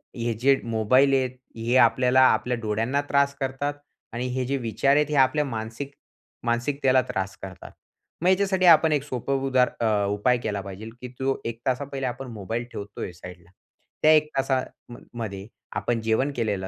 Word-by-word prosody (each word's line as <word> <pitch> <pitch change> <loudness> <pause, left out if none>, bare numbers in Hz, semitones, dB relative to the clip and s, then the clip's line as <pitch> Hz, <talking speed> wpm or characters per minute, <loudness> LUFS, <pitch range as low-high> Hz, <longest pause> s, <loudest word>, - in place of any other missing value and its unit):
हे 115 -1 -1
जे 135 +1 +5 0.2
मोबाईल 130 +6 +4
आहेत, 130 -1 +2 0.3
हे 115 +2 -1
आपल्याला 125 +2 +3
आपल्या 120 +3 +1
डोळ्यांना 115 +5 -1
त्रास 140 0 +3
करतात 135 +2 -2 0.4
आणि 125 +2 -2
हे 130 -1 -1
जे 140 +2 -1
विचार 130 +3 +1
आहेत, 150 0 +4
हे 150 - -1
आपल्या 150 +3 +1
मानसिक 115 +2 -5 0.5
मानसिकतेला 130 +2 +2
त्रास 95 0 -3
करतात. 95 -1 -9 0.5
मग 175 - +1
ह्याच्यासाठी 190 0 +2
आपण 165 -2 +7
एक 145 - 0
सोपं 135 -1 -2
उदार 130 -1 +3
अ, 105 -3 +1
उपाय 105 +5 +2
केला 100 -2 -2
पाहिजे, 100 +3 -8
की 125 - -6
तो 135 0 -1
1 115 -1 -4
तासा 130 +2 +1
पहिले 135 -1 -5
आपण 125 +2 -5
मोबाईल 110 +2 -4
ठेवतोय 100 -2 -6
साइडला. 90 0 -12 0.5
त्या 155 - +6
1 155 0 +3
तासाम 130 -2 -2 0.3
मध्ये 100 -2 -5 0.3
आपण 120 -1 -1
जेवण 115 +6 +1
केलेलं 105 -5 -1
125 Hz, 170 wpm, -25 LUFS, 110-135 Hz, 0.5 s, आपण